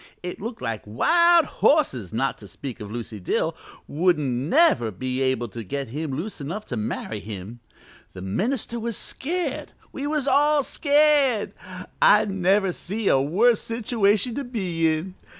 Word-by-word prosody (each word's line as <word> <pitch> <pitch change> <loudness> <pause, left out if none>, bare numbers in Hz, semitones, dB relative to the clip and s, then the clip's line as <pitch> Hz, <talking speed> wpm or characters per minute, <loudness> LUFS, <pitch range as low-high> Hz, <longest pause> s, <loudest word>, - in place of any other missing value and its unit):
It 180 +1 -6
looked 225 - -6
like 115 -3 -3
wild 340 - +4
horses, 130 - +1
not 130 +5 -1
to 105 - -11
speak 125 +7 -8
of 105 -2 -7
Lucy 115 -1 -6
Dill, 90 - -1 0.3
wouldn't 160 -2 +1
never 135 - +3
be 130 +6 -3
able 130 -3 0
to 115 +3 -7
get 135 +6 -4
him 150 +5 -4
loose 165 +6 -5
enough 175 +10 -5
to 125 - -4
marry 110 0 -4
him. 105 +3 -8 0.5
The 95 - -9
minister 230 - -2
was 230 -1 -3
scared; 350 +6 -3 0.2
we 280 +1 -4
was 295 -2 -1
all 290 +2 +4
scared. 285 -6 +2 0.5
I - - +6
never 195 0 +1
see 205 +5 -2
a 135 - +4
worse 210 - +3
situation 225 -1 0
to 280 - -3
be 185 -10 -1
in. 160 +4 -1
180 Hz, 155 wpm, -24 LUFS, -, 0.5 s, I